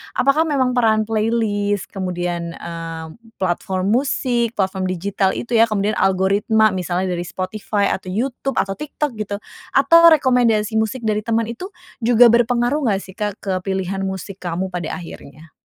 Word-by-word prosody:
apakah 290 Hz, +5 st, +3 dB
memang 265 Hz, -4 st, +1 dB
peran 225 Hz, -3 st, +2 dB
playlist, 215 Hz, -2 st, -1 dB
kemudian, 175 Hz, -3 st, -3 dB
eee, 165 Hz, -1 st, -7 dB, 0.2 s
platform 185 Hz, +1 st, -1 dB
musik, 240 Hz, -2 st, 0 dB
platform 190 Hz, -1 st, -1 dB
digital 190 Hz, +1 st, -1 dB
itu 240 Hz, -, -6 dB
ya, 230 Hz, -1 st, +5 dB
kemudian 215 Hz, 0 st, -1 dB
algoritma, 200 Hz, +3 st, +3 dB
misalnya 185 Hz, 0 st, -2 dB
dari 175 Hz, 0 st, -3 dB
Spotify, 200 Hz, +2 st, -2 dB
atau 185 Hz, -, -4 dB
YouTube, 250 Hz, +7 st, -2 dB
atau 195 Hz, -, 0 dB
TikTok 295 Hz, 0 st, -4 dB
gitu, 205 Hz, -1 st, -3 dB, 0.4 s
atau 280 Hz, +5 st, +6 dB, 0.2 s
rekomendasi 230 Hz, -6 st, +2 dB
musik 220 Hz, +3 st, -2 dB
dari 215 Hz, -1 st, +1 dB
teman, 230 Hz, +1 st, 0 dB
itu 240 Hz, +11 st, -7 dB, 0.3 s
juga 235 Hz, 0 st, +6 dB
berpengaruh 240 Hz, +3 st, +2 dB
nggak 195 Hz, -2 st, +1 dB
sih, 190 Hz, -, -11 dB
Kak, 210 Hz, 0 st, -3 dB
ke 195 Hz, -, -2 dB
pilihan 190 Hz, 0 st, -3 dB
musik 190 Hz, 0 st, -6 dB
kamu 175 Hz, 0 st, -3 dB
pada 175 Hz, -3 st, -4 dB
akhirnya? 160 Hz, -2 st, -10 dB
205 Hz, 150 wpm, -20 LUFS, 185-235 Hz, 0.4 s, atau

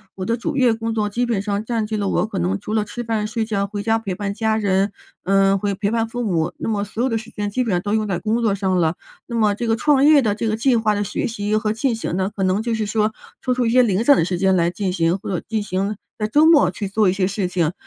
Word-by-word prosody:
我 185 Hz, -, -5 dB
的 230 Hz, -, +1 dB
主 275 Hz, +5 st, -3 dB
业 250 Hz, -4 st, +4 dB
工 225 Hz, 0 st, -3 dB
作 215 Hz, -2 st, 0 dB
基 230 Hz, +4 st, -1 dB
本 235 Hz, -4 st, 0 dB
上 205 Hz, +1 st, -2 dB
占 225 Hz, -1 st, -1 dB
据 215 Hz, +1 st, -3 dB
了 200 Hz, -2 st, -1 dB
我 -, -, +1 dB
可 205 Hz, -3 st, -4 dB
能 185 Hz, +3 st, 0 dB
除 210 Hz, +2 st, -5 dB
了 220 Hz, -1 st, +2 dB
吃 215 Hz, +4 st, -6 dB
饭 220 Hz, -2 st, -1 dB
睡 220 Hz, +1 st, -2 dB
觉， 200 Hz, -2 st, -1 dB
回 205 Hz, 0 st, -5 dB
家 225 Hz, +1 st, +2 dB
陪 200 Hz, -5 st, -4 dB
伴 200 Hz, +1 st, -3 dB
家 220 Hz, +1 st, 0 dB
人， 200 Hz, -1 st, +1 dB, 0.3 s
呃， 195 Hz, +1 st, +3 dB
会 200 Hz, 0 st, -1 dB
陪 200 Hz, +1 st, -1 dB
伴 225 Hz, 0 st, 0 dB
父 245 Hz, +1 st, -3 dB
母， 175 Hz, -6 st, 0 dB
那 -, -, -5 dB
么 210 Hz, -2 st, 0 dB
所 215 Hz, +3 st, -3 dB
有 265 Hz, -, +1 dB
的 225 Hz, -2 st, 0 dB
时 220 Hz, +1 st, -11 dB
间 205 Hz, 0 st, -4 dB
基 255 Hz, +5 st, 0 dB
本 230 Hz, -, -2 dB
上 180 Hz, -, +2 dB
都 205 Hz, +3 st, -3 dB
用 215 Hz, -1 st, +1 dB
在 190 Hz, -3 st, -1 dB
工 220 Hz, +5 st, -1 dB
作 215 Hz, -4 st, +2 dB
上 190 Hz, -2 st, 0 dB
了。 165 Hz, 0 st, +1 dB, 0.3 s
那 235 Hz, -, -5 dB
么 215 Hz, -3 st, +3 dB
这 235 Hz, +3 st, -4 dB
个 225 Hz, -, +2 dB
创 275 Hz, +3 st, +3 dB
业 295 Hz, -2 st, +6 dB
的 210 Hz, -3 st, +1 dB
这 220 Hz, +2 st, -3 dB
个 215 Hz, -, 0 dB
计 245 Hz, +2 st, +2 dB
划 220 Hz, -2 st, +1 dB
的 205 Hz, -, 0 dB
学 200 Hz, -, -2 dB
习 210 Hz, -2 st, -2 dB
和 215 Hz, 0 st, 0 dB
进 240 Hz, +3 st, 0 dB
行 200 Hz, -5 st, -3 dB
呢， 190 Hz, +1 st, -1 dB
可 200 Hz, -, -4 dB
能 190 Hz, +3 st, +1 dB
就 235 Hz, 0 st, -1 dB
是 220 Hz, -2 st, -1 dB
说 215 Hz, 0 st, 0 dB, 0.3 s
抽 255 Hz, -, 0 dB
出 250 Hz, -1 st, 0 dB
一 -, -, +2 dB
些 250 Hz, +2 st, +5 dB
零 210 Hz, -2 st, +1 dB
散 280 Hz, +2 st, +6 dB
的 -, -, +2 dB
时 180 Hz, -, -2 dB
间 190 Hz, 0 st, +3 dB
来 170 Hz, -1 st, +2 dB
进 190 Hz, +1 st, -2 dB
行， 170 Hz, +1 st, +1 dB
或 -, -, -7 dB
者 185 Hz, -4 st, -1 dB
进 220 Hz, 0 st, -1 dB
行 200 Hz, +1 st, -2 dB, 0.2 s
在 215 Hz, -, -1 dB
周 295 Hz, +8 st, +4 dB
末 300 Hz, -, +5 dB
去 200 Hz, +2 st, -4 dB
做 200 Hz, 0 st, +2 dB
一 -, -, +3 dB
些 190 Hz, -1 st, 0 dB
事 195 Hz, 0 st, -2 dB
情， 175 Hz, -3 st, 0 dB
210 Hz, 330 characters per minute, -21 LUFS, 195-225 Hz, 0.3 s, 业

